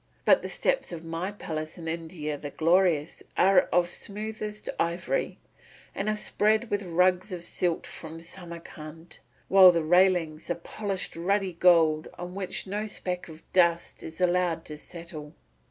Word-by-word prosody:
But - - +6
the - - -5
steps - - 0
of 165 -1 -7
my 165 +4 -3
palace 155 -6 -5
in 165 -2 -7
India 160 -2 -4
the 145 0 -6
Glorious 165 0 +2 0.2
are 190 0 +5
of 175 0 +2
smoothest 210 +1 -5
ivory, 170 - -1 0.6
and 205 - -2
are 215 - +1
spread 215 +2 +1
with 205 0 +1
rugs 180 +2 +2
of 175 -2 -5
silk 175 -1 -1
from 160 0 -9
Samarcand, 165 -2 -10 0.3
while 190 -1 +9
the 170 -2 0
railings 175 -2 +3
are - - +2
of 170 0 -15
polished 200 -3 -4
ruddy 190 +2 0
gold 165 -3 +4
on 175 +1 -6
which 190 -1 -4
no 205 +3 -3
speck 180 -3 -4
of 160 0 -12
dust 170 -2 +2
is 160 +2 -9
allowed 175 -2 +1
to 150 - -7
settle. 155 -2 -9
175 Hz, 155 wpm, -27 LUFS, 165-190 Hz, 0.6 s, while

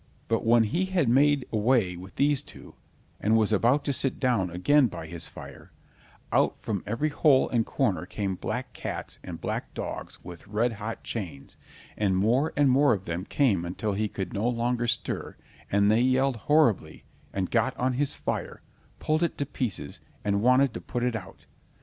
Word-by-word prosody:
But 115 -1 0
when 115 0 +5
he 170 - 0
had 185 -7 +1
made 140 +2 +4
away 110 -4 +2
with 90 +2 -11
these 145 -1 +2
two, - - -13 0.5
and 110 +2 +3
was 110 -1 +2
about 120 +7 +3
to 140 - 0
sit 135 -1 -1
down 115 -8 +1
again 125 +11 +3
by 85 -6 -7
his 85 +1 -7
fire, - - -12 0.6
out - - +3
from 100 -5 -3
every 115 +9 0
hole 145 -2 +4
and 115 -2 +1
corner - - 0
came 100 -2 -2
black 90 - -4
cats - - -5
and - - -7
black - - -4
dogs - - -5
with 90 +1 -11
red 115 +4 0
hot 110 +1 -6
chains, 85 -12 -6 0.4
and 95 -3 +1
more 120 +10 +2
and 145 -2 +4
more 140 +1 +5
of 95 -3 -3
them 85 +3 -3
came 110 - +2
until 100 +4 -3
he 105 +2 0
could 95 -3 -5
no 110 +4 0
longer 120 0 0
stir, 120 0 -2 0.4
and 100 +1 +4
they 110 +2 +4
yelled 130 0 +2
horribly, 150 - +3 0.3
and 95 -2 -2
got 115 -2 +1
on 125 +1 +1
his 140 +2 0
fire, - - -4 0.3
pulled 155 +1 0
it 170 - 0
to 140 - -1
pieces, 125 -7 -4 0.2
and 100 0 +1
wanted 125 +2 +4
to - - -6
put 120 - -3
it 125 -1 0
out. 110 - -8
115 Hz, 185 wpm, -27 LUFS, 100-135 Hz, 0.6 s, when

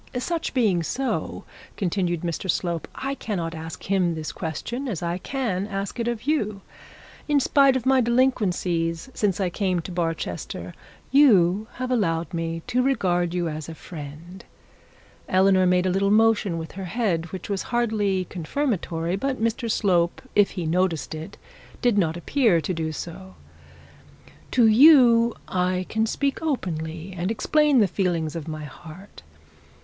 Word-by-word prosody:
'Such 330 +4 -2
being 210 -9 +3
so,' 260 - -3 0.3
continued 175 -3 -1
Mr 175 +2 -4
Slope, 170 -1 -1
'I 270 +1 -3
cannot 180 -11 -3
ask 160 0 -7
him 185 -3 +1
this 155 -1 -5
question 235 - -4
as 185 -8 -3
I 170 +1 -2
can 205 -6 -2
ask 200 +3 -4
it 235 - -1
of 235 -2 -2
you. 215 -9 -1 0.7
In 295 -1 +3
spite 275 -1 +4
of 260 -2 -2
my 265 -1 +4
delinquencies 195 -7 0
since 200 -3 0
I 185 -3 0
came 185 -1 0
to 180 - -8
Barchester 165 -2 -3 0.4
you 215 -8 +5
have 255 0 -4
allowed 170 -7 0
me 165 0 -3
to 250 - +1
regard 180 -10 +1
you 175 -1 0
as 155 0 -5
a 165 - -7
friend.' 160 +4 -10 0.9
Eleanor 185 0 +4
made 180 0 +3
a 185 - +2
little 195 +2 +1
motion 215 -4 +3
with 160 0 -6
her 190 0 -6
head 175 -5 -1
which 190 -2 -6
was 200 -2 -2
hardly 215 -6 0
confirmatory, 175 - -2
but 265 +6 -2
Mr 230 +1 -1
Slope 175 -5 +1
if 205 -1 +5
he 175 - -2
noticed 170 -1 0
it, 155 +1 -8 0.4
did 240 -4 +2
not 165 -2 0
appear 215 - +2
to 165 +4 -2
do 160 -1 -2
so. 120 - -8 1.1
'To 245 -2 +4
you 235 -1 +7
I 185 0 0
can 220 +1 0
speak 275 +4 -1
openly, 170 - -3
and 180 +2 -2
explain 295 +5 +2
the 205 - +4
feelings 170 -4 -1
of 165 -2 -5
my 155 -1 -5
heart. 160 +6 -12
185 Hz, 155 wpm, -24 LUFS, 170-230 Hz, 1.1 s, you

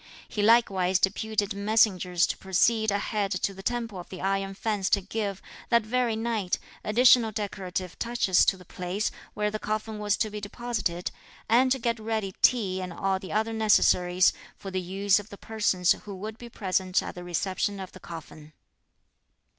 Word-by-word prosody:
He 210 - -3
likewise 195 -5 +4
deputed 205 +1 0
messengers 200 -4 +2
to - - -2
proceed 220 +4 +2
ahead 200 0 -1
to 190 +2 -1
the 195 - -10
Temple 230 -3 -3
of 175 - -10
the 185 - -8
Iron 195 0 -1
Fence 205 -2 -1
to 200 - +3
give, 200 0 -4 0.3
that 235 -3 +3
very 240 0 +1
night, 220 -5 -1 0.3
additional 235 +1 +5
decorative 190 -4 -4
touches 235 -6 +3
to 195 - +2
the 180 - -15
place 180 +4 -3 0.2
where 210 0 0
the 215 - -3
coffin 215 0 -3
was 205 -1 +1
to 215 - -1
be 210 0 -6
deposited, 205 -5 -3 0.4
and 255 +3 +4
to 265 - +3
get 235 -2 -1
ready 220 -3 -2
tea 195 -7 +3
and 185 -1 -5
all 190 +2 -1
the 190 - -9
other 220 +2 0
necessaries, 185 -4 +4 0.2
for 195 - -8
the 185 0 -1
use 195 +3 +2
of 205 +1 -10
the 200 - -10
persons 200 -5 +1
who 205 -2 -2
would 215 +4 -7
be 240 - -9
present 185 -3 0
at - - -6
the 180 - -8
reception 190 +3 -2
of 190 -1 -7
the 185 - -13
coffin. 155 -3 -10
205 Hz, 180 wpm, -27 LUFS, 185-220 Hz, 0.4 s, additional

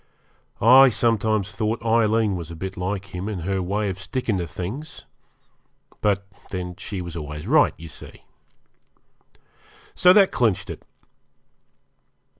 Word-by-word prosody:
I 130 +4 +8
sometimes 110 -3 +1
thought 110 +3 -2
Aileen 110 -2 +2
was 85 -3 -6
a 85 - -8
bit 95 +3 -6
like 95 +1 -4
him 90 +4 -4
in 100 -5 -4
her 95 +2 -1
way 100 +4 -1
of 95 -1 -4
sticking 110 -1 -2
to 85 - -3
things. 110 - -7 1.0
But 100 -2 +1 0.2
then 90 -1 -5
she 95 +1 -5
was 85 -2 -7
always 75 -1 -6
right, - - +4
you 80 - -10
see. 80 - -11 1.7
So 180 - +6
that 195 0 +6
clinched 115 -7 0
it. - - -9
100 Hz, 135 wpm, -23 LUFS, 90-115 Hz, 1.7 s, I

